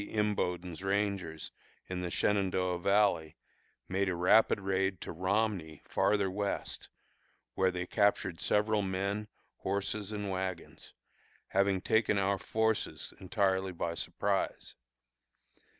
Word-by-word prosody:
Imboden's 90 Hz, -5 st, -1 dB
rangers, 95 Hz, -5 st, -1 dB, 0.4 s
in 90 Hz, 0 st, -3 dB
the 90 Hz, -, -2 dB
Shenandoah 95 Hz, -2 st, +1 dB
Valley, 100 Hz, -5 st, +2 dB, 0.5 s
made 95 Hz, +1 st, 0 dB
a 90 Hz, -, -1 dB
rapid 95 Hz, +6 st, +5 dB
raid 95 Hz, -1 st, 0 dB
to -, -, -5 dB
Romney, 95 Hz, -3 st, -1 dB
farther 100 Hz, -2 st, +2 dB
west, 100 Hz, +1 st, -3 dB, 0.6 s
where 95 Hz, 0 st, +3 dB
they 90 Hz, -1 st, -3 dB
captured 100 Hz, -4 st, +1 dB
several 105 Hz, 0 st, +2 dB
men, 100 Hz, +2 st, -2 dB, 0.3 s
horses, 100 Hz, +1 st, -2 dB
and 105 Hz, -2 st, -3 dB
wagons, 95 Hz, -2 st, -5 dB, 0.5 s
having 100 Hz, -1 st, +2 dB
taken 110 Hz, 0 st, +2 dB
our 100 Hz, 0 st, +1 dB
forces 110 Hz, -1 st, -1 dB
entirely 95 Hz, -1 st, +1 dB
by 85 Hz, 0 st, -2 dB
surprise. -, -, -2 dB
95 Hz, 110 wpm, -32 LUFS, 90-105 Hz, 0.6 s, rapid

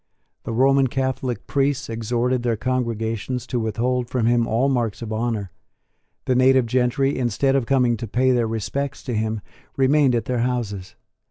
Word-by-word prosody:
The -, -, -3 dB
Roman 135 Hz, +3 st, +3 dB
Catholic 130 Hz, -2 st, -2 dB
priests 140 Hz, -1 st, 0 dB
exhorted 120 Hz, +2 st, -1 dB
their 120 Hz, -2 st, 0 dB
congregations 115 Hz, 0 st, -2 dB
to 125 Hz, -, -2 dB
withhold 120 Hz, +3 st, -1 dB
from 125 Hz, -3 st, 0 dB
him 120 Hz, 0 st, +2 dB
all 120 Hz, +5 st, +1 dB
marks 120 Hz, -5 st, -1 dB
of 110 Hz, -1 st, -4 dB
honour. 110 Hz, -4 st, -2 dB, 0.7 s
The 130 Hz, -, +2 dB
native 130 Hz, 0 st, +4 dB
gentry, 130 Hz, +3 st, +1 dB
instead 130 Hz, +2 st, +1 dB
of 130 Hz, -4 st, 0 dB
coming 125 Hz, -4 st, +2 dB
to 115 Hz, -, -5 dB
pay 130 Hz, +5 st, +2 dB
their 120 Hz, -2 st, +2 dB
respects 120 Hz, +6 st, -3 dB
to 125 Hz, -, -4 dB
him, 110 Hz, -1 st, -1 dB, 0.4 s
remained 135 Hz, -1 st, +4 dB
at 115 Hz, -2 st, -1 dB
their 125 Hz, -1 st, -1 dB
houses. 115 Hz, -7 st, -3 dB
125 Hz, 165 wpm, -22 LUFS, 115-130 Hz, 0.7 s, native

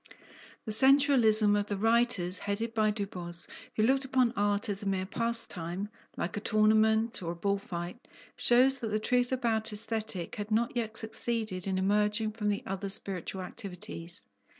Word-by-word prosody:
The 220 Hz, -, -4 dB
sensualism 235 Hz, -4 st, +6 dB
of 205 Hz, 0 st, -1 dB
the 205 Hz, -, -3 dB
writers 225 Hz, -4 st, +2 dB
headed 220 Hz, +3 st, -3 dB
by 215 Hz, -1 st, +2 dB
Du 205 Hz, -1 st, -2 dB
Bos, 175 Hz, -3 st, -4 dB, 0.3 s
who 215 Hz, -, +1 dB
looked 265 Hz, +4 st, +2 dB
upon 255 Hz, -2 st, +1 dB
art 205 Hz, +1 st, 0 dB
as 200 Hz, -2 st, -2 dB
a 200 Hz, -, -5 dB
mere 190 Hz, -1 st, -1 dB
pastime, 205 Hz, -4 st, -3 dB, 0.3 s
like 175 Hz, -, -3 dB
a -, -, -2 dB
tournament 220 Hz, +1 st, +2 dB
or 170 Hz, -1 st, -3 dB
a -, -, -11 dB
bull 200 Hz, +3 st, -1 dB
fight, 175 Hz, +5 st, -7 dB, 0.3 s
shows 260 Hz, +3 st, +4 dB
that 230 Hz, -, -4 dB
the 215 Hz, -, 0 dB
truth 245 Hz, +3 st, +1 dB
about 230 Hz, -4 st, -1 dB
Aesthetic 220 Hz, -4 st, -3 dB
had 205 Hz, 0 st, -5 dB
not 230 Hz, +3 st, 0 dB
yet 220 Hz, -2 st, -3 dB
succeeded 220 Hz, -4 st, -3 dB
in 190 Hz, -1 st, -1 dB
emerging 210 Hz, +3 st, +1 dB
from 210 Hz, -1 st, -2 dB
the 205 Hz, -, -2 dB
other 195 Hz, +1 st, -4 dB
spiritual 190 Hz, -1 st, +1 dB
activities. 180 Hz, -3 st, -7 dB
215 Hz, 170 wpm, -30 LUFS, 195-230 Hz, 0.3 s, sensualism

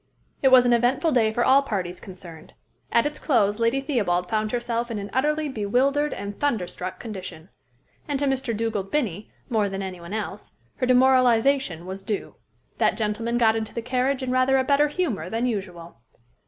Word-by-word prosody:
It 270 Hz, -, +4 dB
was 255 Hz, -1 st, +7 dB
an 245 Hz, -, +4 dB
eventful 245 Hz, +7 st, +2 dB
day 225 Hz, -5 st, +3 dB
for 240 Hz, +2 st, 0 dB
all 270 Hz, +2 st, +6 dB
parties 185 Hz, -9 st, -4 dB
concerned. 175 Hz, -4 st, -12 dB, 0.4 s
At 235 Hz, -, +3 dB
its 295 Hz, 0 st, -3 dB
close 210 Hz, -7 st, +1 dB
Lady 230 Hz, +4 st, +1 dB
Theobald 190 Hz, -, -1 dB
found 215 Hz, -1 st, 0 dB
herself 240 Hz, 0 st, -2 dB
in 230 Hz, -, -3 dB
an 200 Hz, 0 st, -6 dB
utterly 300 Hz, +3 st, +1 dB
bewildered 270 Hz, +5 st, +1 dB
and 200 Hz, 0 st, -6 dB
thunderstruck 185 Hz, -8 st, -2 dB
condition. 185 Hz, -6 st, -8 dB, 0.6 s
And 290 Hz, -2 st, -1 dB
to 285 Hz, -, -1 dB
Mr. 265 Hz, -4 st, -1 dB
Dugald 215 Hz, -4 st, -2 dB
Binnie, 210 Hz, -, -2 dB, 0.2 s
more 215 Hz, -5 st, +1 dB
than 195 Hz, 0 st, -4 dB
to -, -, -3 dB
any 185 Hz, -2 st, -7 dB
one 170 Hz, +4 st, -8 dB
else, 210 Hz, -1 st, -5 dB, 0.2 s
her 255 Hz, -, -1 dB
demoralization 255 Hz, -, +3 dB
was 190 Hz, +1 st, -6 dB
due. 205 Hz, +1 st, -4 dB, 0.5 s
That -, -, +2 dB
gentleman 225 Hz, +2 st, -1 dB
got 225 Hz, -2 st, +4 dB
into 220 Hz, -1 st, -4 dB
the 235 Hz, -, -2 dB
carriage, 255 Hz, +2 st, 0 dB
in 255 Hz, -, -2 dB
rather 255 Hz, +1 st, +3 dB
a 260 Hz, -, +2 dB
better 285 Hz, +2 st, +3 dB
humor 275 Hz, -, -2 dB
than 230 Hz, +4 st, -1 dB
usual. 180 Hz, -, -5 dB
230 Hz, 185 wpm, -24 LUFS, 200-260 Hz, 0.6 s, was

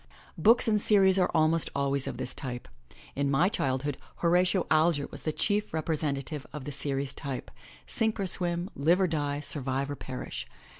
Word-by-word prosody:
Books 225 Hz, +8 st, +4 dB
in 215 Hz, -1 st, +3 dB
series 195 Hz, -2 st, +5 dB
are 180 Hz, -, +3 dB
almost 160 Hz, +1 st, +2 dB
always 140 Hz, -1 st, 0 dB
of -, -, -4 dB
this -, -, -4 dB
type. 125 Hz, -, -5 dB, 0.5 s
In 140 Hz, 0 st, 0 dB
my 155 Hz, +7 st, +3 dB
child 130 Hz, -, -1 dB
hood 145 Hz, -2 st, -2 dB, 0.2 s
Horatio 180 Hz, +2 st, +2 dB
Alger 155 Hz, -2 st, +3 dB
was -, -, -2 dB
the 155 Hz, -, -1 dB
chief 205 Hz, +3 st, -1 dB
representative 150 Hz, -2 st, -2 dB
of 150 Hz, -2 st, -7 dB
the 145 Hz, -, -4 dB
series 140 Hz, -1 st, -2 dB
type 135 Hz, -3 st, -5 dB, 0.2 s
— 65 Hz, -1 st, -22 dB
Sink 220 Hz, -, -1 dB
or 195 Hz, -, 0 dB
Swim, 175 Hz, 0 st, -1 dB
Live 165 Hz, +6 st, +3 dB
or 190 Hz, -, +4 dB
Die, 145 Hz, -4 st, -1 dB
Survive 135 Hz, -1 st, -1 dB
or -, -, -3 dB
Perish. 130 Hz, -2 st, -6 dB
155 Hz, 185 wpm, -29 LUFS, 140-180 Hz, 0.5 s, series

